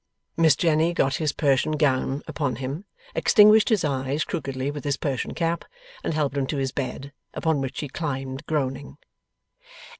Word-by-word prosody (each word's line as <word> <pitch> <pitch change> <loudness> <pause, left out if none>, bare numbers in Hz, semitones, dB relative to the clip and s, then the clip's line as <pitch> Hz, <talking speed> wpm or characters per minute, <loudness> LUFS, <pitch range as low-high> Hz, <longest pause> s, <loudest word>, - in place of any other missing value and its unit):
Miss 160 -4 +5
Jenny 165 +1 +2
got 135 -4 +2
his 155 -2 0
Persian 140 +1 +1
gown 140 -1 +1
upon 140 -5 -2
him, 135 - -5 0.3
extinguished 215 -1 +6
his 215 -8 +2
eyes 135 +1 -1
crookedly 135 -1 -3
with 145 0 -7
his 145 -2 0
Persian 135 -4 -3
cap, 170 0 -1 0.4
and 160 - -1
helped 145 -3 0
him 135 -2 0
to 150 - -2
his 135 -1 -1
bed: 135 +1 -5 0.2
upon 160 -4 +1
which 135 -1 -4
he 150 - -4
climbed 135 -2 -4
groaning. 140 -2 -2
145 Hz, 160 wpm, -25 LUFS, 135-155 Hz, 0.4 s, extinguished